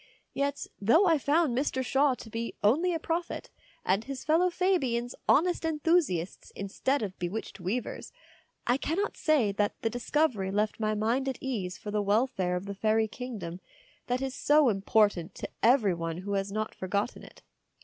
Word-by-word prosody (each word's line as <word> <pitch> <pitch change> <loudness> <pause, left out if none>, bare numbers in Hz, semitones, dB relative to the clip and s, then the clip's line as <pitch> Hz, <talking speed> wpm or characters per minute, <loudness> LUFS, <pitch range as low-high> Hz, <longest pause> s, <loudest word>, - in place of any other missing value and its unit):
Yet, 280 0 -1 0.2
though 280 - +5
I 325 -4 +4
found 290 -2 +2
Mr. 260 -1 0
Shaw 270 0 +3
to 225 - -11
be 230 +1 -4
only 305 - +3
a 335 - 0
prophet 335 +1 -3 0.3
and 195 +4 +2
his 275 +1 -6
fellow 330 +4 +3
Fabians 270 -11 0 0.2
honest 350 +3 +3
enthusiasts 305 - 0
instead 225 +7 -1
of 190 -3 -5
bewitched 185 +5 -4
weavers, 200 +7 -3 0.5
I 245 +2 +3
cannot 355 +9 -1
say 285 -10 +2
that 205 +1 -1
the 225 - +1
discovery 245 -5 0
left 210 +3 0
my 215 -1 0
mind 235 +6 0
at 265 - -4
ease 200 -9 -3
for 210 - -7
the 210 0 +1
welfare 205 -3 +1
of 180 +2 -4
the 200 - -4
fairy 220 +2 +2
kingdom 205 -8 -6 0.5
that 250 +2 0
is 265 -1 -2
so 290 0 +4
important 195 -3 +2
to - - -6
every 225 -5 +4
one 165 -1 -3
who 200 +3 -4
has 195 0 -1
not 215 +1 -2
forgotten 200 +5 -2
it. - - -15
235 Hz, 170 wpm, -29 LUFS, 200-285 Hz, 0.5 s, though